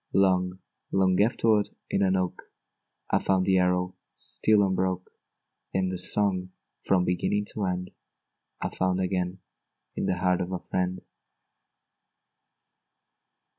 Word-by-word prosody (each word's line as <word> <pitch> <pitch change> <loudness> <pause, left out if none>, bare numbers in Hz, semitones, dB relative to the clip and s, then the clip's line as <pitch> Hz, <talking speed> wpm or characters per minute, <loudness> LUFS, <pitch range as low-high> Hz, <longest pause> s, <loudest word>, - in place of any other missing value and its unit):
Long, 90 -1 +2 0.3
long 95 -1 +2
afterward, 110 -1 +2 0.2
in - - +1
an 95 -1 +2
oak, 90 -1 -2 0.7
I - - +3
found 95 -1 +1
the 95 -1 +3
arrow 90 0 0 0.2
still 105 -1 +5
unbroke; 95 -1 -1 0.6
And 95 -1 +1
the 95 - -3
song, 95 -1 +1 0.3
from 90 -2 +2
beginning 105 +3 0
to 105 - -2
end, 90 0 -3 0.7
I - - -2
found 95 0 0
again 90 0 -2 0.5
in - - -2
the 90 - 0
heart 90 0 +1
of 90 +1 -4
a 90 - -1
friend. 90 +1 -3
95 Hz, 125 wpm, -27 LUFS, 90-95 Hz, 0.7 s, still